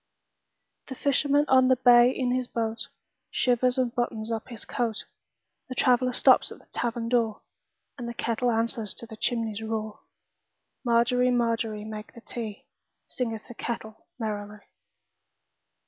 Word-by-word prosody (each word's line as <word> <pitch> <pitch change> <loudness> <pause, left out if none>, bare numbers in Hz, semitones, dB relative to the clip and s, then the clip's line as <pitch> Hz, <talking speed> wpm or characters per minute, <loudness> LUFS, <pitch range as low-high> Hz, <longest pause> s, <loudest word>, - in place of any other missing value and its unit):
The 265 - -6
fisherman 285 +2 +2
on 260 -1 +5
the 260 - +5
bay 245 -1 +7
in 255 -1 -1
his 255 -1 -1
boatShivers 240 +2 -1
and 250 -2 +1
buttons 230 -2 -2
up 225 -1 -3
his 235 -4 -8
coat; 230 -3 -2 0.6
The 255 - -5
traveller 250 0 +3
stops - - +4
at - - -9
the - - -21
tavern 235 -1 -2
door, 230 -3 +1 0.6
And 235 -1 -4
the 235 - -6
kettle 235 +2 0
answers 225 -2 -1
the 225 -1 -9
chimney's 225 -1 -1
roar. 220 -1 -4 0.8
Margery, 245 +1 +3
Margery, 230 -3 0
make 215 -1 -7
the 235 - -11
tea, 220 -4 -6 0.4
Singeth 225 -4 -4
the - - -9
kettle 220 -2 -6
merrily. 210 -2 -4
235 Hz, 135 wpm, -27 LUFS, 220-250 Hz, 0.8 s, bay